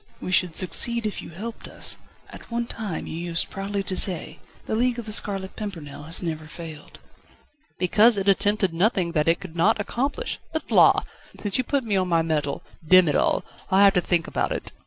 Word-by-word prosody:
"We 185 Hz, -, -5 dB
should 180 Hz, -2 st, +2 dB
succeed 235 Hz, +5 st, +1 dB
if 210 Hz, -, -3 dB
you -, -, -10 dB
helped 215 Hz, +8 st, -8 dB
us. -, -, -5 dB, 0.3 s
At -, -, -12 dB
one 235 Hz, 0 st, -2 dB
time 215 Hz, -7 st, -5 dB
you -, -, -6 dB
used 170 Hz, 0 st, -2 dB
proudly 195 Hz, 0 st, -3 dB
to 190 Hz, -, -2 dB
say: 180 Hz, -3 st, -1 dB, 0.3 s
'The -, -, -4 dB
League 245 Hz, +2 st, +1 dB
of 235 Hz, -, -5 dB
The 215 Hz, -, -4 dB
Scarlet 195 Hz, -2 st, -2 dB
Pimpernel 155 Hz, -9 st, -7 dB
has 165 Hz, +3 st, -1 dB
never 155 Hz, -2 st, -4 dB
failed.'" 155 Hz, -2 st, -10 dB, 0.8 s
"Because 210 Hz, +5 st, +5 dB
it 195 Hz, 0 st, -2 dB
attempted 200 Hz, -1 st, +3 dB
nothing 180 Hz, -1 st, +1 dB
which 150 Hz, -2 st, 0 dB
it 165 Hz, -, +3 dB
could 175 Hz, -4 st, -10 dB
not 200 Hz, +7 st, +3 dB
accomplish. 275 Hz, -, -2 dB
But, 315 Hz, -, -3 dB
la! -, -, +6 dB, 0.4 s
since 205 Hz, +3 st, +1 dB
you -, -, +2 dB
put 275 Hz, +1 st, -1 dB
me 210 Hz, -4 st, 0 dB
on 185 Hz, -1 st, +1 dB
my 165 Hz, -2 st, +2 dB
mettle 150 Hz, -3 st, -2 dB, 0.2 s
Demm 185 Hz, +1 st, +6 dB
it 145 Hz, -, 0 dB
all! -, -, +1 dB, 0.2 s
I'll 195 Hz, +1 st, +5 dB
have 200 Hz, -1 st, +6 dB
to 180 Hz, -, +2 dB
think 170 Hz, -2 st, +1 dB
about -, -, -2 dB
it!" -, -, -3 dB
190 Hz, 205 wpm, -24 LUFS, 165-215 Hz, 0.8 s, la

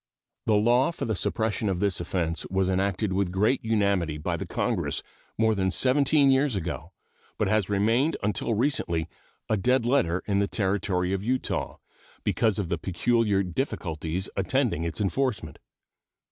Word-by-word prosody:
The 110 Hz, -, +4 dB
law 120 Hz, +5 st, +4 dB
for 170 Hz, -, -5 dB
the 110 Hz, -, -1 dB
suppression 110 Hz, +1 st, -1 dB
of 90 Hz, -2 st, -1 dB
this 100 Hz, -2 st, 0 dB
offense 85 Hz, -1 st, -2 dB
was 95 Hz, 0 st, +1 dB
enacted 95 Hz, +1 st, 0 dB
with 95 Hz, -1 st, 0 dB
great 105 Hz, +8 st, +1 dB
unanimity 100 Hz, -8 st, +1 dB
by 75 Hz, -, -2 dB
Congress -, -, -2 dB, 0.3 s
more 110 Hz, 0 st, +3 dB
than 95 Hz, -2 st, 0 dB
seventeen 140 Hz, -, +3 dB
years 135 Hz, -2 st, +2 dB
ago, 90 Hz, -3 st, -4 dB, 0.5 s
but -, -, +1 dB
has 105 Hz, -2 st, +1 dB
remained 115 Hz, +9 st, +2 dB
until 105 Hz, +2 st, 0 dB
recently 100 Hz, -, 0 dB, 0.4 s
a 110 Hz, -, +1 dB
dead 125 Hz, +4 st, +2 dB
letter 120 Hz, -9 st, +1 dB
in 100 Hz, -1 st, +1 dB
the 100 Hz, -, +1 dB
Territory 95 Hz, -3 st, 0 dB
of 95 Hz, 0 st, -2 dB
Utah, 130 Hz, +3 st, -2 dB, 0.5 s
because 110 Hz, -3 st, +1 dB
of 100 Hz, -4 st, -2 dB
the 85 Hz, -3 st, -1 dB
peculiar 100 Hz, +2 st, +1 dB
difficulties 90 Hz, -, -3 dB
attending 105 Hz, -, 0 dB
its 85 Hz, -, -3 dB
enforcement. 100 Hz, -, -1 dB
100 Hz, 150 wpm, -26 LUFS, 95-115 Hz, 0.5 s, The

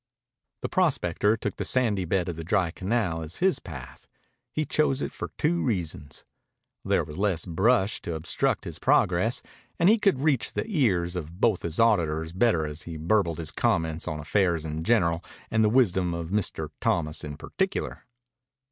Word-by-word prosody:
The -, -, 0 dB
prospector 115 Hz, -, +2 dB
took -, -, -4 dB
the -, -, -2 dB
sandy 110 Hz, -8 st, +1 dB
bed 90 Hz, +1 st, 0 dB
of 85 Hz, -, -3 dB
the 80 Hz, -, -6 dB
dry 85 Hz, +1 st, +1 dB
canal 95 Hz, -3 st, -1 dB
as 80 Hz, +2 st, -6 dB
his 185 Hz, -6 st, +2 dB
path. 65 Hz, -, -10 dB, 0.4 s
He 155 Hz, +3 st, -1 dB
chose 140 Hz, -1 st, +1 dB
it -, -, -3 dB
for -, -, -6 dB
two 170 Hz, +3 st, +1 dB
reasons. 85 Hz, -, -3 dB, 0.6 s
There -, -, +2 dB
was 75 Hz, +4 st, -8 dB
less 95 Hz, -5 st, +1 dB
brush 95 Hz, +4 st, +2 dB
to 85 Hz, -, -4 dB
obstruct 80 Hz, -, 0 dB
his -, -, -6 dB
progress, -, -, +2 dB, 0.3 s
and 170 Hz, -, +4 dB
he 225 Hz, +1 st, +5 dB
could 195 Hz, -11 st, +2 dB
reach 145 Hz, -6 st, +1 dB
the -, -, -2 dB
ears 100 Hz, -, +1 dB
of 85 Hz, +1 st, -6 dB
both 110 Hz, -5 st, +2 dB
his 85 Hz, +3 st, -3 dB
auditors 80 Hz, -8 st, +2 dB
better 95 Hz, -5 st, +2 dB
as 75 Hz, +1 st, -6 dB
he 85 Hz, 0 st, -7 dB
burbled 85 Hz, 0 st, +1 dB
his 80 Hz, -2 st, -4 dB
comments 80 Hz, -8 st, 0 dB
on 75 Hz, -, -3 dB
affairs 85 Hz, 0 st, +1 dB
in 80 Hz, +1 st, -4 dB
general 85 Hz, -5 st, +2 dB, 0.3 s
and 110 Hz, 0 st, +3 dB
the 105 Hz, -, +4 dB
wisdom 95 Hz, -8 st, +2 dB
of 85 Hz, -1 st, -5 dB
Mr. 105 Hz, +1 st, -1 dB
Thomas 75 Hz, -2 st, 0 dB
in 75 Hz, -1 st, -6 dB
particular. -, -, -3 dB
90 Hz, 175 wpm, -27 LUFS, 80-115 Hz, 0.6 s, he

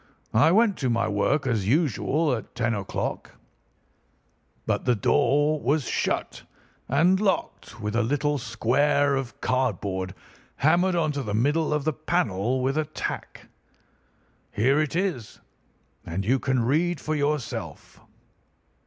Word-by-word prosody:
I 135 Hz, +9 st, +5 dB
went 215 Hz, +1 st, +3 dB
to 130 Hz, -, -1 dB
my 115 Hz, -1 st, +1 dB
work 110 Hz, +8 st, +1 dB
as 110 Hz, -6 st, 0 dB
usual 150 Hz, -, +1 dB
at 115 Hz, 0 st, -6 dB
ten 115 Hz, -1 st, 0 dB
o'clock, 100 Hz, -3 st, -4 dB, 1.3 s
but -, -, -1 dB
the 125 Hz, -1 st, +3 dB
door 145 Hz, +7 st, +2 dB
was 140 Hz, +1 st, 0 dB
shut -, -, -2 dB, 0.5 s
and 170 Hz, +8 st, +3 dB
locked, 190 Hz, -, -2 dB
with 105 Hz, 0 st, -3 dB
a 120 Hz, -, +3 dB
little 145 Hz, +4 st, 0 dB
square 140 Hz, +4 st, +1 dB
of 130 Hz, -5 st, -5 dB
cardboard 100 Hz, -7 st, -1 dB, 0.4 s
hammered 175 Hz, +5 st, +2 dB
on 160 Hz, -3 st, +1 dB
to 145 Hz, -1 st, -3 dB
the 105 Hz, -5 st, -3 dB
middle 150 Hz, +8 st, +1 dB
of 150 Hz, -1 st, 0 dB
the 155 Hz, +1 st, 0 dB
panel 130 Hz, -, -1 dB
with 135 Hz, +4 st, +1 dB
a 155 Hz, -, 0 dB
tack. 155 Hz, -, -6 dB, 1.1 s
Here 130 Hz, +7 st, +2 dB
it 155 Hz, -1 st, -1 dB
is, 170 Hz, -, -2 dB, 0.6 s
and 95 Hz, +4 st, -4 dB
you 130 Hz, +5 st, +2 dB
can 130 Hz, -3 st, 0 dB
read 160 Hz, +5 st, +1 dB
for 155 Hz, -, -3 dB
yourself." 145 Hz, -3 st, -3 dB
140 Hz, 135 wpm, -25 LUFS, 115-155 Hz, 1.3 s, I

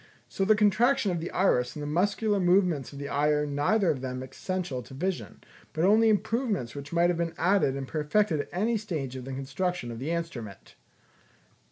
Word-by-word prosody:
So 195 Hz, -, -1 dB
the 215 Hz, +2 st, +5 dB
contraction 215 Hz, +2 st, +3 dB
of 175 Hz, -, -1 dB
the 165 Hz, -, -4 dB
iris 125 Hz, -10 st, +1 dB
and 150 Hz, -, -5 dB
the -, -, -4 dB
muscular 200 Hz, +6 st, +1 dB
movements 180 Hz, -6 st, +2 dB
of 140 Hz, -, -10 dB
the 140 Hz, 0 st, -5 dB
eye 145 Hz, +1 st, +1 dB
are 150 Hz, 0 st, +2 dB
neither 155 Hz, +7 st, +2 dB
of 135 Hz, -4 st, -4 dB
them 130 Hz, 0 st, -4 dB
essential 145 Hz, 0 st, -4 dB
to 130 Hz, -, -12 dB
vision, 185 Hz, +5 st, -4 dB, 0.3 s
but 160 Hz, +2 st, +1 dB
only 220 Hz, +3 st, +5 dB
improvements 210 Hz, -, 0 dB
which 140 Hz, 0 st, -8 dB
might 170 Hz, +1 st, +3 dB
have 175 Hz, -, -2 dB
been 170 Hz, -1 st, -2 dB
added 180 Hz, -6 st, +2 dB
and 135 Hz, -1 st, -5 dB
perfected 155 Hz, +3 st, +1 dB
at 145 Hz, -, -4 dB
any 220 Hz, +6 st, 0 dB
stage 155 Hz, -11 st, -4 dB
of 130 Hz, -1 st, -7 dB
the 135 Hz, -, -6 dB
construction 140 Hz, +1 st, -3 dB
of 115 Hz, -, -7 dB
the 140 Hz, +5 st, -4 dB
instrument." 165 Hz, -12 st, -5 dB
170 Hz, 200 wpm, -28 LUFS, 140-195 Hz, 0.3 s, the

